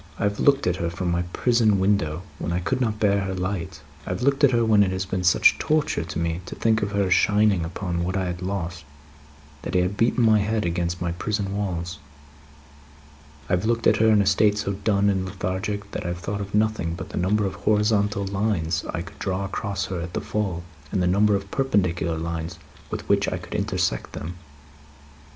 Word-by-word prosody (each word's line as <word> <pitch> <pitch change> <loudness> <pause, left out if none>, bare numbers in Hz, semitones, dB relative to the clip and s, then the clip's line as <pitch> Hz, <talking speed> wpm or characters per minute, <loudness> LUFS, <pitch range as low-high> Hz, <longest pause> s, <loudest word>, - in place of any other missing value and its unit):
"I - - -3
have 100 0 0
looked 140 -1 +4
at 90 0 +1
her 85 -1 -1
from 85 +1 -2
my 85 0 +1
prison 115 -3 +3
window, 90 -5 +1 0.2
when - - -3
I 85 - 0
could 130 +9 -1
not 110 -3 0
bear 100 -1 +3
her 95 -1 -3
light. 90 -3 -3 0.3
I - - -4
have 90 +5 -2
looked 140 +2 +2
at 140 - +8
her 120 -2 +2
when 110 -2 +5
it 100 - +3
has 95 0 -2
been 95 -1 -2
such 90 - +5
torture 155 0 +1
to - - -6
me 85 +1 -1
to - - -6
think 110 -1 +2
of 100 - -1
her 100 -2 +1
shining 105 -2 +3
upon 85 0 -3
what 90 +2 -1
I 95 - 0
had 90 0 -4
lost, 90 -3 -3 0.8
that - - -5
I 90 - +5
have 90 +3 -1
beaten 120 +2 +2
my 110 -1 +5
head 105 0 0
against 85 +1 -1
my 85 - -1
prison 100 +2 -2
walls. 90 -5 -3 1.5
I - - -1
have 90 +4 +1
looked 115 0 0
at - - +5
her, 110 - +4
in 105 -2 +5
a - - -3
state 105 +2 +3
so 100 -1 -1
dull 100 +1 0
and 95 -2 +1
lethargic, 95 +2 -3
that - - -4
I - - -4
have 85 0 -3
thought 100 +3 -3
of 100 +1 -5
nothing 105 -6 +1
but 85 - -7
the - - -6
number 100 +4 +2
of 95 - -2
horizontal 105 +1 +1
lines 95 -4 -1
I 85 - -3
could 85 - -13
draw 95 0 -2
across 100 0 -3
her 90 -3 -4
at 85 +1 -6
the - - -1
full, 95 -5 -2 0.3
and - - 0
the 90 - +2
number 100 +3 +3
of 100 0 -4
perpendicular 90 - 0
lines 85 0 -4 0.3
with - - -5
which - - +2
I - - -1
could - - -10
intersect - - -1
them." 85 +3 -5
95 Hz, 220 wpm, -24 LUFS, 90-105 Hz, 1.5 s, at